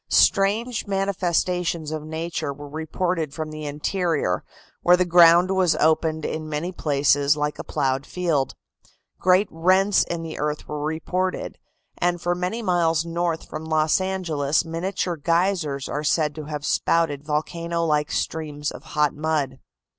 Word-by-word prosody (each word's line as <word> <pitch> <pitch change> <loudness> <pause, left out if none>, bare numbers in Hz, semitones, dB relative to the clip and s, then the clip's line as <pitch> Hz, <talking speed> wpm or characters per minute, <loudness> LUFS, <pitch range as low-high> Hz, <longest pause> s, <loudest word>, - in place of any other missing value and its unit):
Strange 215 +4 +2
manifestations 180 -4 0
of 155 -1 -3
nature 160 -1 -4
were 145 +1 -9
reported 160 0 -2
from 155 0 -4
the 155 -1 -6
interior, 150 - -1 0.4
where 180 +1 +5
the 180 - +2
ground 175 +1 +6
was 185 -3 +3
opened 160 0 +1
in 155 0 -4
many 155 +4 -2
places 145 -3 +2
like 150 0 -2
a - - -4
ploughed 135 -2 -1
field. 160 -6 -1 0.6
Great 185 +2 +4
rents 185 +4 +3
in 170 -1 -4
the 160 -1 -6
earth 150 0 -2
were 150 -1 -4
reported, 180 +4 -2 0.4
and 175 0 +1
for 175 +1 0
many 180 +6 -3
miles 170 -4 +2
north 170 -1 -2
from 155 - -6
Los 155 +2 +2
Angeles 165 -7 0
miniature 175 +1 -2
geysers 165 -3 0
are 150 - -3
said 150 0 +1
to 155 0 -7
have 150 -1 -5
spouted 150 -3 +1
volcano 170 +3 -2
like 150 -1 +1
streams 150 -2 -2
of - - -9 0.2
hot 150 -1 +3
mud. 150 -4 -1
160 Hz, 145 wpm, -23 LUFS, 150-180 Hz, 0.6 s, ground